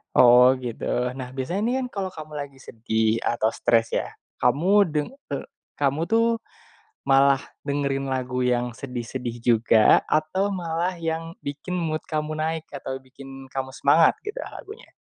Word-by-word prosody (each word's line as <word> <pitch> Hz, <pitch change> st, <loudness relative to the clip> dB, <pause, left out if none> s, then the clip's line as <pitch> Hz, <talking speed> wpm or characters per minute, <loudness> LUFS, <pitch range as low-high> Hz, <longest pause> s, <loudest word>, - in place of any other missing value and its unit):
Oh 125 Hz, +1 st, +8 dB
gitu, 120 Hz, -3 st, -6 dB, 0.3 s
nah 130 Hz, -1 st, -6 dB
biasanya 135 Hz, +9 st, -3 dB
ini 240 Hz, -, +1 dB
kan 255 Hz, -, -2 dB
kalo 195 Hz, -1 st, -1 dB
kamu 155 Hz, -3 st, -10 dB
lagi 140 Hz, -2 st, -6 dB
sedih 110 Hz, -2 st, 0 dB
atau 120 Hz, -2 st, +1 dB
stress 115 Hz, 0 st, +1 dB
ya, -, -, -2 dB, 0.3 s
kamu 140 Hz, +8 st, +2 dB, 0.2 s
deng 150 Hz, -1 st, -1 dB, 0.2 s
eee, 140 Hz, -, -3 dB, 0.3 s
kamu 145 Hz, +3 st, +1 dB
tuh 230 Hz, 0 st, +4 dB, 0.8 s
malah 135 Hz, 0 st, +4 dB, 0.2 s
dengerin 140 Hz, -1 st, -1 dB
lagu 130 Hz, -1 st, -2 dB
yang 125 Hz, 0 st, +1 dB
sedih-sedih 120 Hz, -1 st, -6 dB
juga 115 Hz, -2 st, +5 dB
atau 185 Hz, +6 st, 0 dB
malah 175 Hz, 0 st, -2 dB
yang 165 Hz, 0 st, -4 dB
bikin 145 Hz, +6 st, -5 dB
mood 160 Hz, -3 st, -2 dB
kamu 155 Hz, 0 st, -3 dB
naik 160 Hz, 0 st, -2 dB
atau 135 Hz, -1 st, -6 dB
bikin 135 Hz, 0 st, -12 dB
kamu 135 Hz, -1 st, -4 dB
semangat 160 Hz, +4 st, +5 dB
gitu 420 Hz, +4 st, -5 dB
lagunya? 440 Hz, +4 st, -10 dB
140 Hz, 150 wpm, -24 LUFS, 125-160 Hz, 0.8 s, Oh